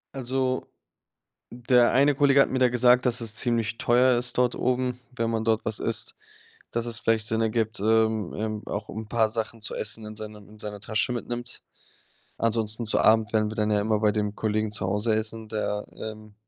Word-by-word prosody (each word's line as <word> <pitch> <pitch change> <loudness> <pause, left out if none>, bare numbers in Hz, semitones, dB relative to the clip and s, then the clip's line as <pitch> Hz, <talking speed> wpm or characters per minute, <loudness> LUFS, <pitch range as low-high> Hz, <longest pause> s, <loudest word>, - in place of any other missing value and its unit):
Also, 130 0 -2 0.8
der 120 0 +3
eine 140 +2 +4
Kollege 140 0 +4
hat - - +3
mir 130 - -1
da 125 - +5
gesagt, 125 +1 +4
dass 125 -1 +2
es 115 -2 -2
ziemlich 115 -1 0
teuer 125 +1 +3
ist 120 0 -4
dort 125 -1 +2
oben, 125 0 -1
wenn 115 -3 -2
man 110 -1 -1
dort 110 -1 +1
was 110 -1 0
isst, 115 0 0 0.6
dass 120 0 -2
es 115 -2 -1
vielleicht 110 -1 +1
Sinn 110 +1 0
ergibt, 110 -1 -1
ähm 110 -2 +1
ähm, 110 0 -3
auch 105 +1 -5
'n 110 0 -7
paar 110 -1 +2
Sachen 115 +1 -4
zu 105 - -4
essen 110 0 0
in 110 - -8
seinem 105 -1 -9
in 105 +1 -16
seiner 105 -1 -5
Tasche 110 +3 -1
mitnimmt. 120 0 -5 0.7
Ansonsten, 115 0 +1
zu 110 - +2
Abend, 110 -1 +4
werden 110 -1 +2
wir 110 - -8
dann 105 -1 0
ja 105 -1 +2
immer 105 0 0
bei 105 -1 +3
dem 105 -1 -2
Kollegen 110 0 -1
zu 105 - -2
Hause 105 +4 0
essen, 110 0 -2
der 105 -1 -2
ähm, 110 -1 -9
110 Hz, 200 wpm, -26 LUFS, 110-120 Hz, 0.8 s, da